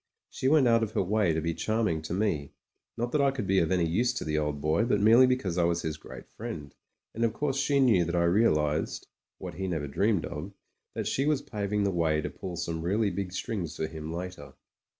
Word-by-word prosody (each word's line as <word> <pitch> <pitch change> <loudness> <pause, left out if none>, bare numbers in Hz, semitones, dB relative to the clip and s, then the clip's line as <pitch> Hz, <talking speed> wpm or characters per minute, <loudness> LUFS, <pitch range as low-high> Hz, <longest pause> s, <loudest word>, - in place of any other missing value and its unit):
She 130 - -2
went 145 -2 +5
out 115 -1 +4
of 110 -1 -2
her - - +1
way 100 -1 +2
to 80 0 -1
be 85 +1 -1
charming 110 -5 0
to 80 - -5
me, 85 -9 -1 0.4
not 120 +1 -2
that 150 - +2
I 140 - +4
could 135 -6 -3
be 95 0 +3
of 80 - +1
any 90 -2 +2
use 120 +10 +1
to - - -3
the 75 0 -1
old 75 -1 -1
boy, 80 +8 +1
but 115 -3 +1
merely 115 +5 +7
because 105 -9 0
I - - +3
was 85 0 +1
his 80 -1 -2
great - - -11
friend; 95 - -7 0.4
and 115 - -2
of 115 -1 +2
course 140 +1 -1
she 140 0 +2
knew 115 -10 +5
that 85 +1 -2
I 85 - +3
realised 80 -5 +1 0.2
— - - -64
what - - -7
he 95 +1 -4
never 80 -5 -2
dreamed 100 +6 +1
of 85 +7 -6 0.2
— - - -52
^that - - -2
she 135 +2 0
was 150 -2 +1
paving 105 -1 -2
the 100 - +1
way 80 -3 +1
to - - -3
pull 90 -2 -7
some 85 -1 -3
really 100 +4 +1
big 95 -2 -4
strings 95 -3 -4
for 80 - -1
him 80 0 -6
later. 90 +2 -7
95 Hz, 245 wpm, -28 LUFS, 80-115 Hz, 0.4 s, merely